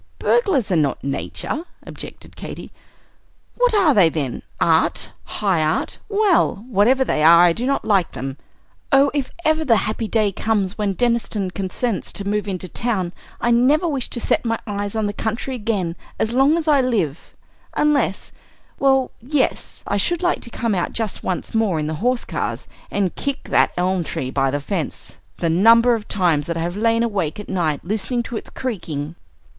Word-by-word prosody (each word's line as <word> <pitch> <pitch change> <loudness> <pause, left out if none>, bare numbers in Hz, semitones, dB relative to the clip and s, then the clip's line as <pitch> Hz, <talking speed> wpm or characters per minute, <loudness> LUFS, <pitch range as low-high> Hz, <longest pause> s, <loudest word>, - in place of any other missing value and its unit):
"Burglars 380 - +2
are - - +3
not 150 -4 0
Nature," 140 - -3 0.2
objected - - -7
Katy. - - -8 0.8
"What - - +2
are 365 -8 +5
they, 185 -7 +5
then? 145 -6 -3 0.2
Art? - - +2
High 190 -6 0
Art? 155 0 -1
Well, 400 - +2
whatever 250 +4 +3
they 155 - 0
are, 170 +2 +8
I 175 -1 +5
do 240 +7 -3
not 275 - 0
like 195 -5 +2
them. 135 +2 -5 0.5
Oh, 275 0 +5
if 280 -3 -2
ever 315 +1 +3
the 245 -7 +4
happy 215 +1 -1
day 215 -2 +1
comes 200 -1 -1
when 205 -3 -1
Deniston 230 -5 0
consents 195 +3 -3
to 200 - -3
move 210 0 -1
into 185 -2 -4
town, 190 -4 -2 0.3
I 240 - +1
never 275 +8 +4
wish 275 -6 -1
to 240 - -2
set - - 0
my 230 -1 0
eyes 205 0 -3
on 220 -1 0
the 205 - -2
country 225 +5 -3
again 205 -8 -2 0.2
as 220 - -1
long 275 +5 +4
as 325 -1 -3
I 290 -3 +5
live, 195 - -2 0.4
unless 290 -9 +1 0.5
well, 270 -1 +3
yes, 265 +2 -1
I 205 - 0
should 345 - 0
like 355 - +1
to - - -6
come 230 -1 -1
out 180 -3 -1
just 220 -3 -2
once 185 - -3
more 215 -7 +1
in 150 - -2
the 155 - -2
horse 250 +1 +1
cars - - -3 0.2
and 195 -3 0
kick 280 -1 -3
that - - +4
elm 180 0 +1
tree 130 -4 -4
by 135 0 +1
the 145 +2 -1
fence! 165 +2 -5 0.2
The 165 -2 0
number 230 +7 +6
of 220 -2 -3
times 170 -7 +1
that 170 -1 -2
I - - -2
have 175 +2 -2
lain 230 +2 +2
awake 200 -8 -2
at 210 - -8
night 165 -6 -1
listening 220 +5 -1
to 235 - -7
its - - -8
creaking!" 165 - -4
215 Hz, 185 wpm, -21 LUFS, 180-250 Hz, 0.8 s, are